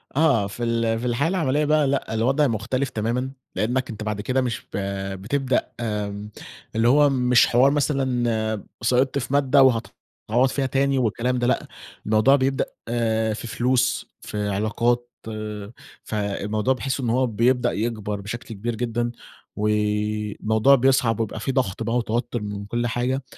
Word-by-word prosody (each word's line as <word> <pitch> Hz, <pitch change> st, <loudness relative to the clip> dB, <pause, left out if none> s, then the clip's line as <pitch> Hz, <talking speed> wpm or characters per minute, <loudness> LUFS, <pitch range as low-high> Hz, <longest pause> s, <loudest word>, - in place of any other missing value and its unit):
آه، 140 Hz, -10 st, +3 dB
في 120 Hz, +4 st, -6 dB
ال 115 Hz, -1 st, +1 dB
في 125 Hz, -, -5 dB
الحياة 125 Hz, +7 st, +1 dB
العمَلية 150 Hz, -5 st, +1 dB
بقى، 150 Hz, -1 st, +3 dB
لأ، 135 Hz, -4 st, -1 dB
الوضع 135 Hz, +6 st, +2 dB
مختلِف 125 Hz, +4 st, -1 dB
تمامًا، 120 Hz, +4 st, -2 dB, 0.2 s
لأنك 125 Hz, +4 st, 0 dB
أنت 110 Hz, -1 st, -6 dB
بعد 105 Hz, -1 st, -3 dB
كده 130 Hz, +3 st, 0 dB
مش 120 Hz, -3 st, -2 dB
ب -, -, -2 dB, 0.4 s
بتبدأ 130 Hz, +3 st, 0 dB
آمم، 105 Hz, -2 st, -3 dB, 0.5 s
اللي 115 Hz, +1 st, +3 dB
هو 145 Hz, +3 st, +5 dB
مش 125 Hz, -2 st, +4 dB
حوار 130 Hz, +4 st, +4 dB
مثلًا 120 Hz, -7 st, 0 dB, 0.2 s
سقِطت 130 Hz, +3 st, +2 dB
في 125 Hz, +2 st, -5 dB
مادة 140 Hz, -1 st, +5 dB
و 130 Hz, -, +8 dB, 0.6 s
هتعوّض 125 Hz, +4 st, +3 dB
فيها 135 Hz, 0 st, -1 dB
تاني 135 Hz, +1 st, +1 dB
والكلام 125 Hz, +1 st, 0 dB
ده، 120 Hz, -, +1 dB
لأ، -, -, 0 dB, 0.4 s
الموضوع 110 Hz, +6 st, +5 dB
بيبدأ 135 Hz, 0 st, +1 dB, 0.7 s
في 115 Hz, -, -6 dB
فلوس، 125 Hz, +2 st, 0 dB
في 105 Hz, -1 st, -3 dB
علاقات، 120 Hz, +4 st, 0 dB, 0.9 s
فالموضوع 105 Hz, +3 st, -1 dB
باحس 135 Hz, +1 st, -3 dB
إن 120 Hz, -3 st, -1 dB
هو 130 Hz, +2 st, +2 dB
بيبدأ 120 Hz, +3 st, +2 dB
يكبَر 105 Hz, -2 st, -3 dB
بشكْل 115 Hz, +4 st, -6 dB
كبير 115 Hz, +3 st, -3 dB
جدًا 120 Hz, 0 st, -1 dB, 0.4 s
والموضوع 105 Hz, +3 st, +2 dB
بيصعَب 125 Hz, -3 st, +2 dB
ويبقى 110 Hz, 0 st, -2 dB
في 135 Hz, -, -2 dB
ضغْط 115 Hz, -5 st, -1 dB
بقى 115 Hz, +2 st, 0 dB
وتوتُّر 120 Hz, 0 st, -1 dB
من 100 Hz, -1 st, -5 dB
كل 120 Hz, +3 st, -1 dB
حاجة. 125 Hz, +3 st, -1 dB
120 Hz, 150 wpm, -23 LUFS, 110-130 Hz, 0.9 s, و